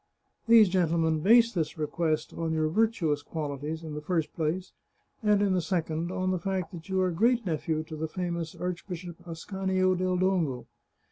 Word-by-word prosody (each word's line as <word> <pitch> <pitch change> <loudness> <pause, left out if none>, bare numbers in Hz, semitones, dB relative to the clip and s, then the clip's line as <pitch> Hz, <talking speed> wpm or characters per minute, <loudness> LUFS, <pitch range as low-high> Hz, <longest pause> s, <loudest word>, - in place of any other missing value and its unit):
These 225 -3 +7
gentlemen 165 -3 +2
base 230 +7 +5
this 160 -4 -2
request 155 +1 -1
on 165 -1 -2
your 155 -1 +1
virtuous 170 -7 +1
qualities, 150 +1 -4
in 155 -2 -6
the 150 - -5
first 160 0 -1
place, 170 +3 -2 0.5
and 210 -2 +3
in 195 -2 +2
the 180 - +2
second, 165 -1 -2
on 185 0 -1
the 185 - 0
fact 190 -1 -2
that 165 0 -10
you 190 0 +1
are 185 -1 +2
great 230 +6 +2
nephew 160 -2 -1
to 155 0 -8
the 160 +1 -3
famous 170 -1 -4
Archbishop 180 -1 -5
Ascanio 185 +2 0
del 185 0 0
Dongo. 175 -9 0
170 Hz, 175 wpm, -28 LUFS, 160-185 Hz, 0.5 s, These